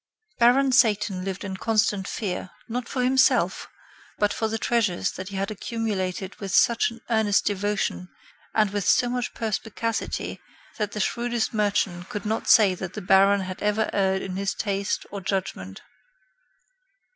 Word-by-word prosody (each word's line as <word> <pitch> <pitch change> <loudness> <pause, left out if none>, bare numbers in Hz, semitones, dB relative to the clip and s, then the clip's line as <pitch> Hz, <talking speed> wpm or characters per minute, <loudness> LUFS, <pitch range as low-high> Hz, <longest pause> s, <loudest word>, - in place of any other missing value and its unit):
Baron 255 +3 +5
Satan 210 -6 +3
lived 190 0 -4
in 190 -1 -5
constant 210 -2 +1
fear, 185 -3 -4 0.2
not 240 +1 -4
for 255 -2 -1
himself, 260 +1 +3 0.5
but 205 0 +1
for 220 - -1
the 220 +1 -2
treasures 220 -6 0
that 185 +1 -7
he 200 - -8
had 195 +2 -2
accumulated 200 -4 -3
with 195 -2 -5
such 235 +4 +4
an 230 -1 -12
earnest 220 -3 +2
devotion 205 -2 -1 0.5
and 215 -3 +3
with 205 -1 -1
so 245 +5 +3
much 245 0 -3
perspicacity 225 +1 -3 0.4
that 210 -1 -2
the 210 - -4
shrewdest 235 +2 -1
merchant 200 -4 0
could 205 - -5
not 220 +2 -2
say 210 -5 +7
that 185 0 -6
the 215 - -4
Baron 195 +1 +5
had 185 0 -6
ever 210 +1 +1
erred 190 -1 +1
in 185 -1 -5
his 195 0 -1
taste 200 -1 -2
or 200 - -5
judgment. 180 - -4
205 Hz, 155 wpm, -25 LUFS, 190-225 Hz, 0.5 s, say